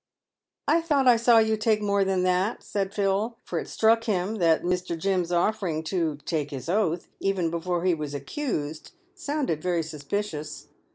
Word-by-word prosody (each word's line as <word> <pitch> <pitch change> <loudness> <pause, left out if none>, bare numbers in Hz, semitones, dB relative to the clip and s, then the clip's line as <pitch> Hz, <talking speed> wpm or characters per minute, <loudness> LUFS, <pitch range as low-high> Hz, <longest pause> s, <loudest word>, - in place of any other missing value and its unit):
"I 335 - +4
thought 290 -5 +2
I 245 - +8
saw 235 0 +5
you 220 0 +4
take 215 0 +2
more 200 -1 +2
than 190 -1 +1
that," 185 +4 +1
said 195 -2 -2
Phil; 205 +3 0
for - - -3
it - - -6
struck 225 +1 +3
him 205 0 -1
that 165 -4 +3
Mr. 180 -1 -1
Jim's 180 0 0
offering 175 -3 0
to 165 -5 0
"take 150 -4 -1
his 135 -2 -7
oath," 180 -2 0
even 185 -4 0
before 170 +1 -2
he 185 - +4
was 150 -3 -4
accused, 155 - -4 0.2
sounded 290 - -2
very 175 -1 0
suspicious. 155 +1 -5
185 Hz, 170 wpm, -26 LUFS, 165-220 Hz, 0.2 s, I